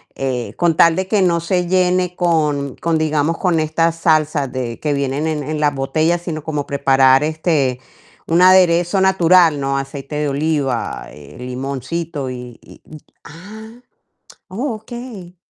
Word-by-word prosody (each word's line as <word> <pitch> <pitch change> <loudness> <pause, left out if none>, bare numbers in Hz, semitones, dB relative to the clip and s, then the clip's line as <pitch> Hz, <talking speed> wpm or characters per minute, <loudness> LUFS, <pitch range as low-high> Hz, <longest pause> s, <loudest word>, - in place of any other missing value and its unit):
Eh, 130 -3 -3
con 170 -2 +2
tal 170 -1 +5
de 190 +1 -2
que 205 0 +1
no 175 -2 +2
se 175 +1 -1
llene 180 0 +1
con 150 -6 0
con, 165 -1 0
digamos, 155 +1 0
con 180 -4 +1
estas 165 +1 0
salsas 155 -4 +1
de 125 -2 -5
que 150 -1 -1
vienen 140 +2 -2
en 155 -2 -2
en 155 +2 -4
las 145 -1 +1
botellas, 155 +5 0
sino 155 -4 -5
como 150 -2 -3
preparar, 135 -1 +3
este, 155 -5 0 0.5
un 165 +2 +2
aderezo 180 0 +4
natural, 180 -4 +4
¿no? 135 0 -1
Aceite 135 +1 -6
de 150 -1 -1
oliva, 140 - -2
eh, 75 0 -14
limoncito 135 +4 -5
y 125 -1 -9
y - - -17
y 155 - -12 0.3
Ah, 220 +9 -12 0.7
oh, 230 +6 -3
okey. 220 -5 -10
155 Hz, 155 wpm, -18 LUFS, 140-175 Hz, 0.7 s, tal